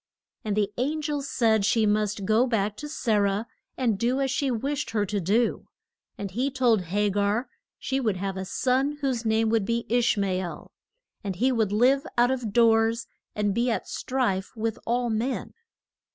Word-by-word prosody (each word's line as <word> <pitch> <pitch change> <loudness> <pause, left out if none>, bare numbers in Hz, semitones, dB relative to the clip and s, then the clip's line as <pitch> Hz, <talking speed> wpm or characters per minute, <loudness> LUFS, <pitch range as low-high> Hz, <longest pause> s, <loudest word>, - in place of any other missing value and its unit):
And 210 -1 -2
the 205 -1 0
an 300 +5 -1
gel 295 -1 -1
said 225 -6 +2
she 220 +2 +3
must 210 -1 0
go 220 +5 +3
back 210 -3 0
to 295 - -7
Sa 230 -7 0
rah 200 +1 +1 0.3
and 230 -6 0
do 245 +4 +1
as 270 -1 0
she 275 0 0
wished 275 +5 -2
her 210 -2 0
to 205 +1 -2
do. 220 +7 +1 0.5
And 200 -2 -5
he 250 +8 0
told 240 -8 +2
Ha 205 +4 +1
gar 205 +5 0 0.3
she 270 - -2
would 220 -7 0
have 195 +1 -3
a 190 - -4
son 260 +8 0
whose 255 -4 -1
name 220 0 +2
would 225 -2 +2
be 235 +3 -1
Ish 240 -1 +2
ma 200 -1 +1
el, 180 -4 -4 0.5
and 195 -2 -3
that - - -14
he 260 +3 +3
would 220 -5 +1
live 255 +6 +3
out 240 +1 +4
of 250 -5 -2
doors 225 +1 +3 0.3
and 205 -1 0
be 235 +4 +1
at 230 - -2
strife 220 -8 -1
with 225 0 -2
all 240 0 +1
men. 230 +5 -2
225 Hz, 195 wpm, -26 LUFS, 205-250 Hz, 0.5 s, out